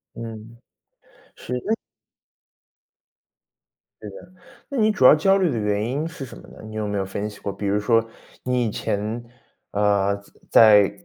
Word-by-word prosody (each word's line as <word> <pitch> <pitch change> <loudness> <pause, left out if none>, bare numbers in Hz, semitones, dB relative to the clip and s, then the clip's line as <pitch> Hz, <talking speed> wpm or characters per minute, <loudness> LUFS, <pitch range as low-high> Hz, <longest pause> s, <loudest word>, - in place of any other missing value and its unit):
嗯。 115 0 -9 0.8
是， 125 - -5
那 220 +1 +1 2.3
对 - - -7
的。 - - -12 0.4
那 280 - -5
你 215 -2 +3
主 210 -11 0
要 135 - +10
焦 195 +6 +3
虑 185 -4 +2
的 120 - -2
原 105 -1 0
因 145 +6 -2
是 165 -4 -8
什 125 - -11
么 - - -13
呢？ - - -14
你 110 0 -9
有 110 -1 -2
没 100 -1 -2
有 95 - -1
分 100 +2 -4
析 105 - -13
过， 100 - -4
比 100 +1 -5
如 100 +1 +1
说 115 +2 +2 0.4
你 125 -1 0
以 110 - -1
前， 105 +4 -3 0.5
呃， 100 -1 +1 0.3
在 105 -3 +7
在 175 - -20
110 Hz, 185 characters per minute, -23 LUFS, 105-135 Hz, 2.3 s, 要